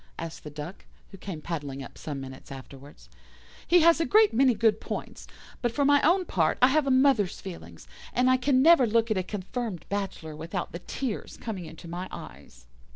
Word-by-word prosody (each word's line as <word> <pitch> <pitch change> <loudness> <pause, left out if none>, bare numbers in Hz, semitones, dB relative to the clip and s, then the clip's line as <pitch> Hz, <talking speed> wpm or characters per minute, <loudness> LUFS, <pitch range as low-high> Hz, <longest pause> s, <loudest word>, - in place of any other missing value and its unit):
asked 165 0 -7
the 150 - -7
Duck, 150 +5 -8 0.3
who 195 - -10
came 180 -5 -6
paddling 145 -5 -5
up - - -11
some 145 -3 -6
minutes 130 +1 -10
afterwards. 135 - -12 0.6
"He 350 +1 +6
has 330 0 +5
a - - +2
great 435 0 +5
many 255 0 +4
good 220 -1 +2
points, - - -6 0.3
but 240 - 0
for 285 +4 +1
my 285 0 +5
own 360 +4 +3
part 165 - +1
I 250 - +6
have 295 +1 +2
a - - +2
mother's 260 -7 +3
feelings, 190 -4 -10 0.2
and 250 +1 +2
I 255 0 +5
can 260 0 +3
never 320 -6 +7
look 230 +1 +2
at 215 - +2
a - - +1
confirmed 200 0 -5
bachelor 195 -6 -4
without 170 +4 -5
the 170 - -6
tears 240 +4 -5
coming 200 -7 -5
into 165 +2 -11
my 175 +2 -5
eyes." - - -11
200 Hz, 200 wpm, -27 LUFS, 160-260 Hz, 0.6 s, never